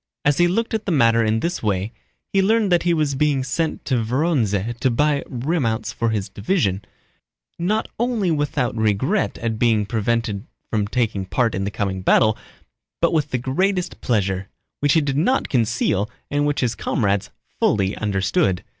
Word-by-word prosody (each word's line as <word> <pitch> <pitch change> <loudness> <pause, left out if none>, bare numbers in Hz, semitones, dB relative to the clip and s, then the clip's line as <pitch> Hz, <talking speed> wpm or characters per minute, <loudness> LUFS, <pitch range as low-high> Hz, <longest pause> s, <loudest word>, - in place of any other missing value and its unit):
As 145 +1 +3
he 175 - +5
looked 225 +6 -1
at 220 -1 -2
the - - +1
matter 115 -6 +4
in 110 0 +1
this 175 +1 -2
way, 100 +1 -1 0.4
he 195 - +4
learned 215 0 +2
that 175 - +4
he 175 - +1
was 155 -4 +1
being 140 -1 +1
sent 155 +5 -2
to 125 -5 +1
Vorónezh 120 - 0
to 130 - +2
buy 145 +4 +1
remounts 125 -3 -1
for 115 - 0
his 105 -3 -1
division, 100 - -1 0.8
not 210 +6 0
only 230 -7 +1
without 145 -6 0
regret 110 - 0
at 115 -2 -3
being 110 -3 +3
prevented 110 0 -1 0.2
from 105 -2 0
taking 105 -4 -1
part 115 +1 +1
in 95 +1 -2
the - - -1
coming 95 -1 -3
battle, 110 +3 +4 0.6
but - - +2
with 150 -3 +1
the 130 - 0
greatest 180 +9 -1
pleasure—which 100 +6 -1
he 160 - +4
did 140 -2 -1
not 255 - +1
conceal 115 -4 +1 0.2
and 145 +1 +1
which 145 - 0
his 120 -3 +1
comrades 100 -3 -1 0.3
fully 100 -2 +2
understood. 95 -2 0
120 Hz, 170 wpm, -21 LUFS, 105-155 Hz, 0.8 s, he